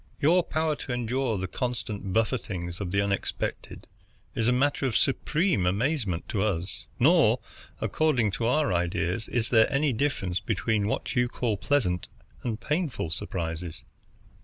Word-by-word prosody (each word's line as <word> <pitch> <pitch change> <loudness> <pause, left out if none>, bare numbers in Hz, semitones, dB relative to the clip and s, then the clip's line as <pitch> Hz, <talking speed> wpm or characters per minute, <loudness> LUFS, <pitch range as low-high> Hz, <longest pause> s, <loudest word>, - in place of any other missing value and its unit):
Your 170 +5 +5
power 155 -1 0
to 130 - -6
endure 120 -1 0
the 95 0 -2
constant 105 -3 -3
buffetings 95 -5 -1
of 95 - -2
the 100 +1 +2
unexpected 100 -1 -3 0.5
is 115 - 0
a - - +5
matter 135 +2 +2
of 120 - +1
supreme 150 - +1
amazement 105 - 0
to 100 - 0
us; 95 -4 -2
nor, - - +5 0.4
according 130 -9 +2
to 115 +4 -1
our 125 -5 +2
ideas, 90 +3 0
is 115 -2 -1
there 110 0 +5
any 140 0 +2
difference 110 -8 0
between 105 -3 0
what 110 - -2
you 120 0 +3
call 120 -3 -1
pleasant 95 -7 0 0.3
and 115 -3 -3
painful 150 - -1
surprises. 80 0 -4
110 Hz, 145 wpm, -27 LUFS, 95-135 Hz, 0.5 s, Your